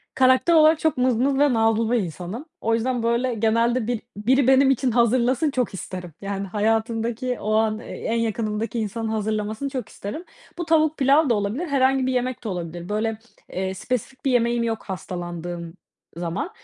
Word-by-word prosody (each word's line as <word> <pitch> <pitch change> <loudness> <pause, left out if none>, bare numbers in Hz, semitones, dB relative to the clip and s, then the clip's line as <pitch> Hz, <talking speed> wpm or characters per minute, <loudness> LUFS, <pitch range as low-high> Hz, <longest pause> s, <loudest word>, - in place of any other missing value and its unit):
karakter 260 +5 +4
olarak 315 0 +6
çok 315 -4 +1
mızmız 255 +2 +2
ve 290 -2 +4
nazlı 225 0 +2
bir 245 - +3
insanım. 185 - -5 0.2
O 225 - +1
yüzden, 240 +1 0
böyle, 235 +2 +1
genelde 230 +1 +1
bil 240 -2 -1 0.2
biri 255 +5 +2
benim 265 +1 +6
için 260 -1 +1
hazırlasın 245 +5 +2
çok 250 -5 -1
isterim. 180 -2 -7
Yani, 200 0 -3
hayatımdaki 225 +4 -1
o 215 +1 -1
an 220 0 +2
e - - -11
en 230 - -3
yakınımdaki 225 0 -2
insanın 220 +1 -3
hazırlamasını 215 +3 -2
çok 255 -5 -5
isterim. 210 - -6 0.3
Bu 345 - -3
tavuk 315 -1 +3
pilav 280 +2 +4
da 235 - +4
olabilir 210 - -2
herhangi 270 -2 +2
bir 260 - 0
yemek 250 0 -2
de 220 - -3
olabilir, 175 -1 -5
böyle, 215 +1 -1 0.3
eee, 190 0 -2
spesifik 250 +6 -4
bir 270 - +3
yemeğim 235 -1 +2
yok 225 -1 -2
hastalandığım 175 -2 -6 0.4
zaman. 175 - -3
230 Hz, 175 wpm, -23 LUFS, 210-260 Hz, 0.4 s, olarak